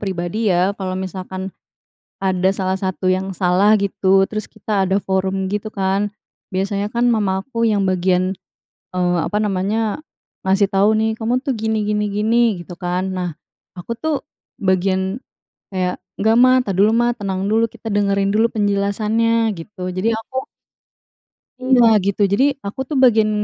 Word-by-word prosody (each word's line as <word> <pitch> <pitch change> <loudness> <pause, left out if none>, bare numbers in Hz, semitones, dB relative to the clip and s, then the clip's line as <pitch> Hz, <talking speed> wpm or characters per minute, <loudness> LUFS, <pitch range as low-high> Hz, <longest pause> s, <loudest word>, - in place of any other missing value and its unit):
pribadi, 195 +3 -2
ya. 185 +2 +2
Kalau 185 -2 -4
misalkan 190 0 -5 0.7
ada 190 -1 +1
salah 190 -1 -1
satu 185 -1 -2
yang 190 +1 -1
salah, 190 +4 +4
gitu, 195 -1 +2
terus 215 0 -4
kita 205 -2 -1
ada 190 +1 +2
forum 190 0 -1
gitu, 210 +1 -2
kan. 195 +1 0 0.4
Biasanya 200 +2 -2
kan, 235 +1 0
mama 195 -4 +1
aku 230 -4 0
yang 205 -2 +2
bagian, 185 0 +1 0.6
eee, 180 -1 +1
apa 210 - -2
namanya, 210 +5 -1 0.4
ngasih 195 +1 +3
tahu, 205 +3 +3
nih, 220 0 +1
“Kamu 245 +4 0
tuh, 275 - -1
gini 220 -1 -1
gini 210 0 0
gini,” 210 +3 0 0.3
gitu 175 - -10
kan. 180 +1 -2
Nah, 180 -1 -2 0.5
aku 180 +5 -8
tuh, 315 -2 0 0.5
bagian 190 +2 0 0.5
kayak, 185 -1 -2 0.2
“Nggak, 220 +2 +3
Ma. 255 0 +6
Ntar 200 -6 -2
dulu, 205 +3 +5
Ma. 240 +1 +3
Tenang 195 -3 -3
dulu. 225 +1 +2
Kita 225 - -8
dengerin 200 -1 +1
dulu 230 +2 +3
penjelasannya,” 215 +2 +1
gitu. 180 +2 -8
Jadi 190 +5 0
aku 260 +3 -6 1.2
iya, 255 -2 +4 0.2
gitu. 200 +1 -1
Jadi, 255 +7 +4 0.2
aku 205 +6 -5
tuh 295 - -2
bagian 220 -3 +5
200 Hz, 155 wpm, -19 LUFS, 190-220 Hz, 1.2 s, Ma